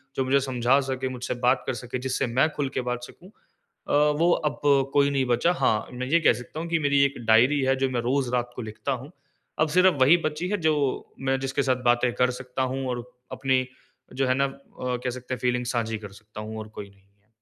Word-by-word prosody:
जो 135 - +1
मुझे 135 +2 +3
समझा 130 0 +2
सके, 130 -1 -3
मुझसे 125 -1 -4
बात 125 +1 +3
कर - - 0
सके, 120 +2 -5
जिससे 130 +1 -1
मैं 130 +6 +2
खुल 140 -2 -1
के - - -1
बात 125 0 -3
सकूँ, 175 +8 -13 0.6
अ, - - -1 0.3
वो 170 +1 +4 0.2
अब - - -11 0.3
कोई 140 0 +4
नहीं 135 -2 +1
बचा। 125 +7 +2
हाँ, 110 -10 +1
मैं 130 +1 -4
ये 165 +5 +4
कह - - +5
सकता 125 +6 -8
हूँ 170 - -4
कि 165 -1 +1
मेरी 140 -2 +3
एक 140 - -1
डायरी 125 +6 +5
है 135 0 +2
जो 135 0 0
मैं 125 -2 -1
रोज़ 130 +2 0
रात 120 -1 0
को 125 - -5
लिखता 110 +5 -5
हूँ। 130 +2 -5 0.5
अब 155 - +3
सिर्फ़ 180 +2 +4
वही 145 +7 +7
बची 155 +4 -2
है 210 - 0
जो 155 - +4 0.5
मैं 135 0 0
जिसके 135 +1 -1
साथ 130 -1 0
बातें 120 0 +3
कर 125 0 +2
सकता 130 0 -5
हूँ 135 -1 -3
और 120 -1 -3 0.3
अपनी 130 -1 +1 0.5
जो 135 0 0
है 130 - +3
ना 140 - +2
अ, 135 - -6 0.3
कह 125 0 -2
सकते 130 +1 -6
है 125 - -2
फ़ीलिंग्स 125 -1 0
साझी 115 -2 -1
कर 105 -2 -10
सकता 105 +1 -11
हूँ 110 +1 -7
और 110 - -7
कोई 100 -1 -7
नहीं 100 0 -24
है। 100 +1 -36
130 Hz, 240 wpm, -25 LUFS, 120-140 Hz, 0.6 s, वही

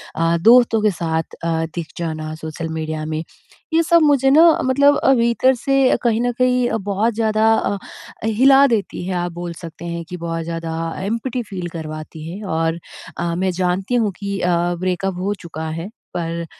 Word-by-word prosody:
अ, 165 +1 +2
दोस्तों 230 0 +5
के 210 -1 +3
साथ 160 -2 -3
अ,‌ 165 -1 0
दिख 170 -3 -4
जाना 155 -2 -4
सोशल 160 +1 -6
मीडिया 155 -1 -3
में, 155 +1 -3 0.5
ये 330 - +4
सब 335 +1 +4
मुझे 280 -3 +4
ना 315 +5 +7 0.2
मतलब 280 +2 +4
अ, 270 - +4
भीतर 235 +2 +3
से 275 -2 +3
कहीं 230 -1 +2
न 245 - +1
कहीं 250 -1 +3
अ, 225 - 0
बहुत 205 +3 -1
ज़्यादा 220 0 +2
अ, 205 - -1 0.5
हिला 270 +5 +5
देती 220 -7 -2
है। 190 - -2
आप 175 - -3
बोल 175 0 -6
सकते 165 +1 -9
हैं 170 0 -4
कि 180 - -5
बहुत 165 -1 -3
ज़्यादा 165 0 -4 0.3
एम्पटी 230 +4 -2
फ़ील 180 -3 -4
करवाती 155 -1 -7
है 195 +5 -7
और 165 +1 0 0.4
अ, 170 0 -2
मैं 185 +1 0
जानती 185 +5 -1
हूँ 225 -4 +2
कि 200 -1 -3
अ, 180 - +2 0.3
ब्रेकअप 185 +1 -1
हो 195 +3 -1
चुका 160 -2 -7
है, 165 +4 -5 0.2
पर 170 -1 -3
185 Hz, 185 wpm, -20 LUFS, 165-235 Hz, 0.5 s, ना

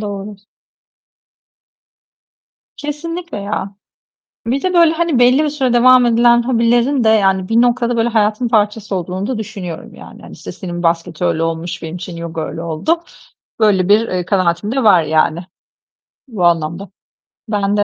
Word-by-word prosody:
doğru. 205 0 -6 2.4
Kesinlikle 330 +2 -6
ya. 200 -1 -4 0.7
Bir 260 +4 -1
de 370 -1 -1
böyle 335 -2 +5
hani 325 -4 0
belli 250 +5 +4
bir - - 0
süre 270 -4 -1
devam 250 +1 +5
edilen 240 0 +4
hobilerin 240 +2 +1
de - - +4
yani 195 -4 +2
bir 225 +1 +3
noktada 240 0 +1
böyle 230 +1 +1
hayatın 220 +1 0
parçası 210 -2 0
olduğunu 185 +2 -4
da 255 -2 -3
düşünüyorum 195 -6 -7
yani. - - -13
Hani, - - -12
işte - - -9
senin 175 -2 -6
basket 165 -1 -1
öyle 170 -2 0
olmuş, 165 +1 -4
benim 165 +1 -6
için 180 -1 -8
yoga 165 -1 -6
öyle 165 +1 -5
oldu. 170 - -1 0.6
Böyle 200 -4 +2
bir, 220 +3 +4
eee, 180 -1 -3
kanaatim 185 +1 0
de 265 0 -1
var 185 -6 +5
yani, 155 +1 +1 0.9
bu 210 -8 -3
anlamda. 170 +3 0 0.6
Ben 205 -1 0
de 205 - +1
210 Hz, 155 wpm, -16 LUFS, 180-245 Hz, 2.4 s, böyle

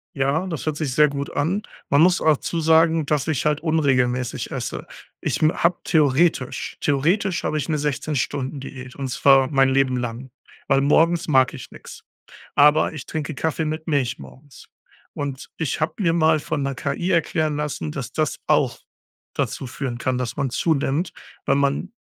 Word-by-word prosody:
Ja, 140 +7 0
das 165 -5 -5
hört 155 -1 -1
sich 145 -5 -2
sehr 150 +1 +5
gut 140 0 -4
an. 170 +8 0 0.3
Man 140 +2 +4
muss 180 +2 +5
dazu 160 +2 +1
sagen, 160 0 +4
dass 150 0 0
ich 155 -3 -1
halt 150 0 +1
unregelmäßig 130 -6 0
esse. - - -5 0.3
Ich - - -2
mm, 155 0 +5
hab 170 +1 0
theoretisch 150 -2 +1
theoretisch 165 +7 +1
habe 155 - -1
ich 145 0 -3
'ne 155 - +1
16-Stunden-Diät 135 -2 -3
und 135 -2 -4
zwar 135 -1 +4
mein 135 -2 +3
Leben 130 -1 +2
lang 120 +2 -5 0.4
weil 135 0 +4
morgens 165 +4 +3
mag 130 -3 +4
ich - - -10
nix. - - -12 0.5
Aber 150 +2 +5
ich 155 -5 -7
trinke 155 -1 -4
Kaffee 160 +3 -1
mit 155 +1 -4
Milch 130 -6 0
morgens 140 +1 -14 0.4
und 140 -2 -5
ich 160 -4 -2
hab 155 +1 -2
mir 170 -6 +2
mal 160 -1 +3
von 150 -1 -3
'ner 135 0 -2
KI 145 +7 -2
erklären 155 -3 +1
lassen, 150 - -3
dass - - -6
das - - -1
auch - - +2 0.6
dazu 135 - -2
führen 125 0 -5
kann, 125 +1 -1
dass 125 -2 -3
man 140 -2 -1
zunimmt, 155 +4 0 0.3
weil 135 - +3
man 140 +8 0
145 Hz, 170 wpm, -22 LUFS, 135-160 Hz, 0.6 s, sehr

